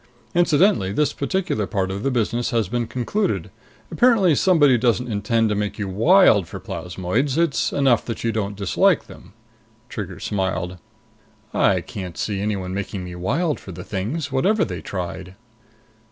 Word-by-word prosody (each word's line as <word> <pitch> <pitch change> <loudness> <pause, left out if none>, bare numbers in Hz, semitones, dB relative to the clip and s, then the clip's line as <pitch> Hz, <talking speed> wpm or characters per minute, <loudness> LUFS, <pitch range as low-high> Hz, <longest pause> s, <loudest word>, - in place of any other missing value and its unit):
Incidentally, 170 - +3
this 150 +8 +1
particular 140 - -1
part 95 -1 -1
of 100 +1 -4
the 135 - 0
business 120 0 0
has 115 -6 0
been 120 +2 -2
concluded. 130 - -2 0.4
Apparently, 225 -9 +4
somebody 145 -4 +4
doesn't 120 +1 +1
intend 110 +2 +1
to 105 - 0
make 105 0 -2
you 100 -3 -3
wild 110 - +5
for - - -7
plasmoids. 95 - -2
It's 165 -4 +1
enough 135 -5 +3
that 115 - -5
you 115 - +1
don't 105 -2 -2
dislike 100 -2 +2
them." - - -14 0.6
Trigger - - -6
smiled. 95 -2 -2 0.7
"I 95 -2 +3
can't 90 -2 -7
see 100 -2 -2
anyone 100 -3 -2
making 100 -1 -4
me 90 0 -7
wild 145 - -1
for 95 - -10
the 90 0 -8
things, 120 - -3
whatever 195 +11 +2
they 90 -3 -6
tried!" 90 0 -6
110 Hz, 155 wpm, -22 LUFS, 95-140 Hz, 0.7 s, wild